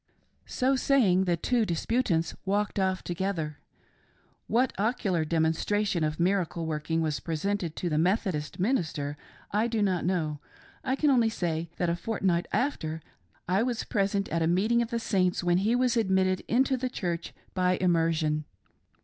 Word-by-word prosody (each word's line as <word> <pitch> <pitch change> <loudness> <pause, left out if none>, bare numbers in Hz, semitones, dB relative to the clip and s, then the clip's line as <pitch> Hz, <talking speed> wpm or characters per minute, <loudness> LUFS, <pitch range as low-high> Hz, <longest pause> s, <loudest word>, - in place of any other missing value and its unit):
So 265 +2 +1
saying, 225 -9 +3
the 175 -2 +1
two 240 +7 +1
disputants 175 -2 0
walked 205 +1 0
off 190 -1 0
together. 175 -4 -3 0.9
What 245 +3 +2
ocular 200 -6 +1
demonstration 170 +4 +1
of 155 +1 -1
miracle 175 -2 0
working 160 +1 -1
was 155 -2 -1
presented 170 +1 -2
to 180 - -3
the 155 -2 +1
Methodist 180 -3 0
minister, 165 - -1 0.4
I 215 +3 +2
do 225 -3 0
not 185 -4 +1
know; 160 -5 -1 0.4
I 260 -1 0
can 295 +1 +3
only 235 -4 +4
say 170 -5 -2
that 175 - 0
a 170 - +1
fortnight 180 -3 -1
after, 160 - -1 0.5
I 185 +3 +2
was 240 -1 -1
present 200 0 0
at 165 - -1
a 160 - +2
meeting 210 +8 +2
of 235 - -2
the 235 - -1
Saints 185 -6 +1
when 175 0 +3
he 215 +5 +2
was 250 -1 +2
admitted 190 -4 +2
into 265 +3 +2
the 255 +1 -2
Church 175 -7 -3 0.2
by 180 -1 +2
immersion. 165 -3 +1
185 Hz, 160 wpm, -28 LUFS, 165-220 Hz, 0.9 s, only